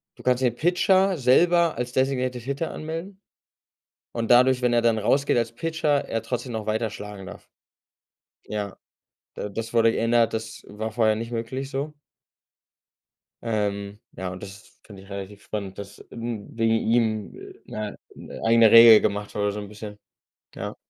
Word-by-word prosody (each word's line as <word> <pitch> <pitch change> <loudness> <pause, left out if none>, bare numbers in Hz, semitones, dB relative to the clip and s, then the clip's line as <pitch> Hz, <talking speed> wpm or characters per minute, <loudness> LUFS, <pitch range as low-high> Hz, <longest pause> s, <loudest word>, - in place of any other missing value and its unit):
du - - -15
kannst 125 0 +1
den 125 -3 +2
Pitcher 185 +5 +2
selber 170 +5 +4
als 125 0 -3
designated 130 -2 0
hitter 140 +5 -3
anmelden 165 +5 -6 0.9
und 115 -1 -3
dadurch, 125 +1 +5
wenn 125 -1 +2
er 120 0 +3
dann 115 -1 +2
rausgeht 135 +7 +2
als 115 -1 0
Pitcher, 155 0 0
er 115 - -2
trotzdem 125 +2 -4
noch 110 -2 -4
weiter 110 +1 -1
schlagen 105 -2 -9
darf. - - -11 1.0
Ja, 105 -2 -5 0.6
d 105 - -4
das 115 +2 -5
wurde 115 -1 +4
geändert. 115 0 +2
Das 110 0 -5
war 110 +2 -5
vorher 110 -1 +2
nicht 115 +2 -5
möglich, 125 +4 -4
so? 140 +3 -4 1.5
Ähm, 100 -2 -2
ja, 95 +1 -5
und 90 0 -8
das 100 0 -12
finde 100 -3 -12
ich 100 - -18
relativ 100 0 -8
spannend, 100 -3 -6
dass, 100 0 -10
ähm, 115 -3 -5
wegen 115 0 +2
ihm, 110 -3 0 0.3
äh, - - -15 0.2
'ne - - -12 0.2
'ne - - -10
eigene 115 -1 +6
Regel 115 -1 +10
gemacht 105 0 -2
habe, 105 0 0
so 105 - -5
'n 105 - -7
bisschen. 105 0 -10 0.6
Ja. - - -5
115 Hz, 165 wpm, -24 LUFS, 105-130 Hz, 1.5 s, Regel